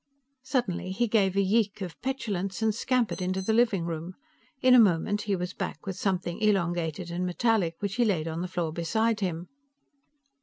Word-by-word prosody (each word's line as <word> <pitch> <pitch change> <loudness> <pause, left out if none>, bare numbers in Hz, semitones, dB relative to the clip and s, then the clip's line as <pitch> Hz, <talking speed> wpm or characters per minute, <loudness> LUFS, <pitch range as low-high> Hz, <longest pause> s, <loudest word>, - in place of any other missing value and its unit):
Suddenly 245 -9 -1
he 235 +5 +1
gave 200 -4 +2
a 200 - +3
yeek 205 +1 +1
of 180 -3 -6
petulance 215 -7 -3
and 220 -1 +2
scampered 240 -2 0
into 185 +1 -1
the 190 +4 0
living 220 -7 +2
room. 170 +2 -5 0.4
In 255 -1 +5
a 250 - +9
moment, 205 0 +3
he 200 - +3
was 180 0 -4
back - - -5
with 190 -2 -3
something 180 -3 -2
elongated 175 -4 0
and 175 +1 -2
metallic 180 -2 +1
which 200 +1 -3
he 245 - +4
laid 180 -8 +1
on 165 +1 -3
the 180 - -2
floor 175 -3 -2
beside 220 +7 0
him. 175 -3 -3
190 Hz, 185 wpm, -28 LUFS, 175-220 Hz, 0.4 s, a